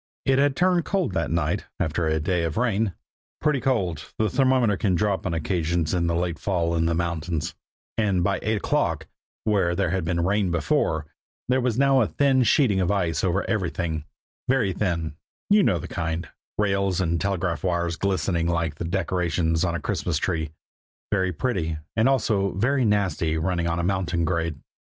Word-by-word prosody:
It 135 0 +3
had 140 -1 +3
turned 180 -1 +3
cold 190 - 0
that 95 - -1
night, 85 +1 0
after 80 -1 0
a 80 0 +1
day 85 +2 0
of 80 -2 -2
rain. 110 -5 +1 0.4
Pretty 150 -4 +1
cold 95 - -1
the 110 -1 +1
thermometer 130 -5 +3
can 95 -1 +1
drop 100 +1 0
on 85 - -1
occasions 85 -1 0
in 85 -2 +1
the 85 - +1
late 85 -1 -1
fall 85 -4 0
in 80 0 +2
the 85 - +1
mountains 85 -1 -2 0.5
and 100 -5 +2
by 95 0 +1
eight 110 +1 0
o'clock, - - 0 0.4
where 95 -5 +2
there 90 -3 0
had 95 -1 0
been 85 0 0
rain 100 0 +1
before, 80 -1 0 0.4
there 130 +1 +3
was 120 -2 0
now 135 -1 +4
a 110 - +2
thin 135 - +2
sheeting 120 -5 +3
of 90 -2 +1
ice 90 -5 0
over 95 +1 0
everything 85 -6 -1 0.5
very 125 -8 +2
thin 85 -6 -2 0.3
you 210 0 +7
know 100 - +3
the 80 - -6
kind 80 0 -3 0.3
rails 100 -3 +1
and 85 -3 0
telegraph 90 -6 -1
wires 85 -2 0
glistening 85 -3 0
like 85 -2 0
the 80 - -6
decorations 85 -2 0
on 85 -2 0
a - - -2
Christmas 80 +1 -1
tree 80 -1 -1 0.6
very 95 -2 +1
pretty 85 -5 -1 0.2
and 115 +3 +4
also 105 -7 +1
very 125 +6 +1
nasty 95 -7 +1
running 85 +1 0
on 85 0 0
a 85 - -1
mountain 90 -2 0
grade. 80 -2 -1
90 Hz, 180 wpm, -25 LUFS, 85-105 Hz, 0.6 s, you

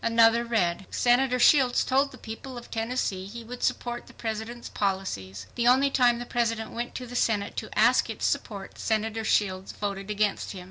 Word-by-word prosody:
Another 230 0 +5
read: 195 -6 0
SENATOR 250 +1 +3
SHIELDS 255 -1 +5
TOLD 275 +1 +2
THE 255 - -12
PEOPLE 245 +3 -8
OF 240 - -10
TENNESSEE 225 -5 -2
HE 235 +3 -8
WOULD 245 +2 -9
SUPPORT 240 0 -2
THE - - -16
PRESIDENT'S 225 +1 -5
POLICIES. 100 - -3
THE 235 - 0
ONLY 270 +3 +5
TIME 245 -3 +4
THE 240 - -5
PRESIDENT 230 -2 -1
WENT 240 +1 -5
TO 255 - -5
THE 245 0 -9
SENATE 210 -4 0
TO - - -4
ASK - - +4
ITS - - -3
SUPPORT 200 -4 -3
SENATOR 220 0 -1
SHIELDS 190 -3 0
VOTED 200 -1 -4
AGAINST 210 -1 -1
HIM. 190 - -7
230 Hz, 185 wpm, -27 LUFS, 205-245 Hz, -, Another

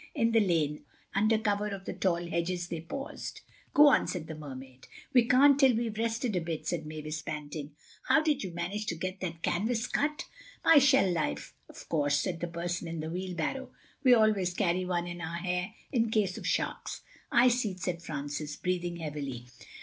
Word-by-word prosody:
In 230 -5 +2
the 225 - +5
lane, 160 -7 +1 0.3
under 215 +3 +3
cover 210 -1 0
of 200 -2 -6
the - - -4
tall 175 -2 0
hedges, 175 +1 -2
they 165 -2 -4
paused. 275 - -6 0.3
"Go 295 +1 +9
on," - - +3
said 175 -4 -3
the 160 - -6
Mermaid. 130 -4 -10 0.3
"We 245 -3 +5
can't 280 +2 +6
till 265 -4 +6
we've 225 -1 -1
rested 230 0 -1
a 180 - +1
bit," 165 -1 -4
said 165 -3 -2
Mavis, 155 0 -5
panting. 150 -1 -6 0.3
"How - - +6
did 305 -5 +1
you 190 - -3
manage 185 +6 -3
to 170 - -1
get 185 +3 -4
that 165 -3 -5
canvas 220 +6 0
cut?" 295 +4 -1 0.4
"My 325 -3 +8
shell 265 -8 +5
knife, 75 - -2 0.2
of - - -12
course," 145 -2 +2
said 175 +1 -2
the 175 - -2
person 170 0 -3
in 165 -1 -4
the 160 +1 -4
wheelbarrow. 185 +8 -3 0.3
"We 255 -2 +7
always 205 -5 +2
carry 185 -2 +1
one 175 -1 -1
in 175 0 -6
our 165 0 -4
hair, 180 +4 -2 0.2
in 230 -5 +2
case 205 -4 +1
of - - -5
sharks." - - -2 0.3
"I 245 +1 +6
see," 235 -6 0
said 175 -2 -3
Francis, 145 -1 -4
breathing 175 0 -2
heavily. 145 -7 -5
180 Hz, 190 wpm, -30 LUFS, 160-220 Hz, 0.4 s, Go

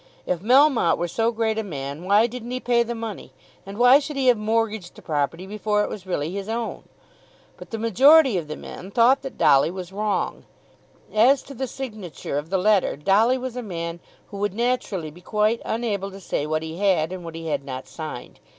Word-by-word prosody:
If 180 - -1
Melmotte 250 - +4
were 175 - -1
so 225 +7 0
great 220 -1 -1
a - - -2
man 145 -2 -6
why 205 +4 +5
didn't 240 0 -6
he 250 +1 -3
pay 240 -1 +2
the 235 0 -2
money, 225 -2 -7 0.3
and 200 +1 -8
why 250 +4 +7
should 295 0 -6
he 260 -2 +3
have 245 - +6
mortgaged 220 -3 -1
the - - -13
property 155 +3 -2
before 210 +1 0
it - - -4
was 190 -3 -8
really 160 -3 -2
his 200 +2 -5
own? 230 0 -4 0.7
But - - -12
the 225 - -4
majority 260 - +5
of 160 - -8
the 150 - -5
men 185 - -9
thought 245 +6 +4
that 270 -1 -8
Dolly 135 +3 +5
was 180 0 -7
wrong. 210 +1 -2 0.7
As 250 +6 +4
to 275 - -10
the 265 +1 -3
signature 215 - -5
of 150 +2 -9
the 190 - +1
letter, 200 0 +2
Dolly 210 - +3
was 255 -1 -5
a 250 - -3
man 170 -5 -5 0.3
who 200 - -7
would 205 0 -2
naturally 225 -9 -1
be 175 +4 -15
quite 215 +4 +1
unable 210 -4 -2
to 195 0 -11
say 150 -5 -3
what 155 +1 -1
he 160 +2 -6
had 180 -5 +2
and 185 -1 -6
what 165 -1 -8
he 165 0 -5
had 145 - -1
not 130 -1 -7
signed. 155 -6 -8
210 Hz, 215 wpm, -23 LUFS, 175-235 Hz, 0.7 s, why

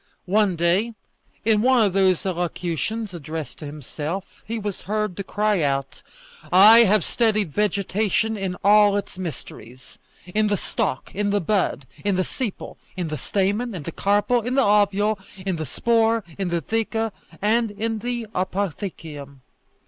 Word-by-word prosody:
One 200 0 +2
day, 180 +7 +1 0.5
in 215 -2 +4
one 250 -2 +4
of 195 - 0
these 190 -2 +2
allocutions 180 +3 -2
addressed 155 -4 -6
to 150 - -7
himself, 150 +5 -6
he 230 +1 -3
was 205 -3 -4
heard 215 -3 -1
to 200 - -4
cry 210 -1 0
out, 140 -1 -1 0.5
"I 215 +6 +9
have 205 -2 +3
studied 215 - +1
vegetation 210 +2 0
in 190 -3 -3
all 205 0 +6
its 195 -2 -5
mysteries 130 -7 -8 0.3
in 210 +4 +1
the 205 -1 +1
stalk, - - -3
in 205 +2 0
the 205 0 +2
bud, 185 -7 0 0.2
in 200 -2 +1
the 185 0 +1
sepal, 240 -7 -5 0.2
in 175 -3 -2
the 155 - -3
stamen, 205 +6 -1
in 165 - -6
the 170 - -5
carpel, 205 +7 +2
in 245 +3 -2
the 270 - +4
ovule, 205 0 +3 0.2
in 190 -2 -3
the 155 -2 -4
spore, 230 - +2
in 195 -2 -2
the 170 -2 -1
theca, 225 - -1 0.3
and 225 +2 +2
in 220 +2 -3
the 240 0 -3
apothecium. 165 -7 -4
200 Hz, 155 wpm, -23 LUFS, 175-215 Hz, 0.5 s, I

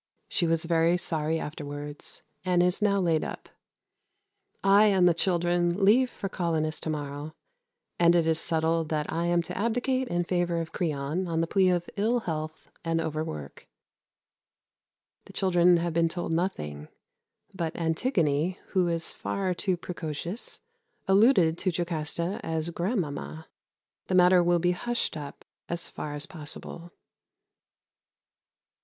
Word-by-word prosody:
She 170 - +1
was 165 0 +1
very 165 +1 +3
sorry 160 -2 -1
afterwards, 145 -1 -7 0.2
and 180 -1 +3
is 180 +2 +1
now 200 -1 +3
laid 165 -4 +2
up. - - -7 1.1
I 200 +2 +6
and 190 -3 +4
the 175 - +5
children 175 +1 +1
leave 250 +5 +5
for 195 - -5
Colonnus 160 -4 -1
to - - -4
morrow, 145 +1 -5 0.6
and 170 0 +5
it 170 -2 +3
is 160 0 +2
settled 160 0 0
that 150 -1 -2
I 170 +1 0
am 175 0 +2
to 180 +1 -6
abdicate 245 +4 0
in 175 -3 0
favour 175 -1 0
of 165 0 -4
Creon 155 +2 -2
on 165 -1 -1
the 165 - +2
plea 185 +2 +3
of 175 -1 0
ill 230 +4 +2
health 155 -4 -5
and 165 -1 0
overwork. 155 - -5 1.6
The - - -14
children 175 -2 +4
have 170 0 -1
been 165 0 +3
told 175 -1 -3
nothing; 75 - -2 0.7
but 165 -4 -3
Antigone, 165 - 0
who 185 -3 +2
is 165 -1 -2
far 190 -2 -2
too 185 0 -1
precocious, 170 - -5 0.5
alluded 190 -5 +5
to 185 - 0
Jocasta 170 +1 -2
as 160 +1 -2
grand 185 +6 0
mamma. 155 +1 -6 0.6
The 185 - 0
matter 180 0 +6
will 175 0 +3
be 175 +1 +2
hushed 240 +2 -2
up 145 -2 -8 0.2
as 170 0 -4
far 145 -1 -5
as 145 - -4
possible. 170 0 -9
170 Hz, 145 wpm, -28 LUFS, 160-185 Hz, 1.6 s, I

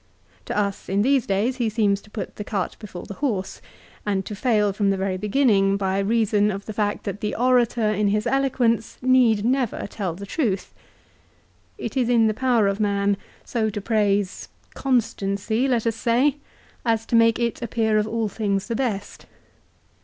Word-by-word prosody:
To - - -3
us, 200 -1 -2
in 200 +2 +2
these 270 -1 +2
days, 210 +7 0
he 235 -3 0
seems 205 -2 +1
to 210 - -19
put 210 - -6
the 210 - -4
cart 200 -3 -3
before 190 -5 -8
the - - -7
horse, 205 -10 -2 0.4
and 195 -2 -1
to - - -6
fail 210 -3 +2
from 205 0 +1
the 195 - +1
very 190 0 -1
beginning 200 -1 +2
by 190 -1 0
reason 210 0 +2
of 200 -1 -4
the 215 - -6
fact 205 -1 -1
that 200 0 -5
the 210 - -2
orator 240 -2 +2
in 210 0 +1
his 210 +1 +1
eloquence 250 -5 +1
need 245 -5 +4
never 255 -2 0
tell 190 -5 -4
the 200 +3 -8
truth. 200 - -2 1.0
It - - -5
is 250 -3 +1
in 235 -2 +4
the 215 - +2
power 240 -3 +2
of 200 +1 -1
man 200 -1 +1 0.3
so 220 -3 0
to 205 0 -4
praise, 205 -2 0 0.2
constancy, 220 -2 0
let 240 -4 +1
us 225 -1 0
say, 255 +5 +2 0.5
as 225 -1 +1
to 235 - -1
make 230 -1 +5
it 235 0 -2
appear 220 -2 +1
of 210 - -1
all 225 0 -1
things 200 -2 -1
the 230 - -1
best. 225 -6 -3
215 Hz, 185 wpm, -23 LUFS, 200-235 Hz, 1.0 s, make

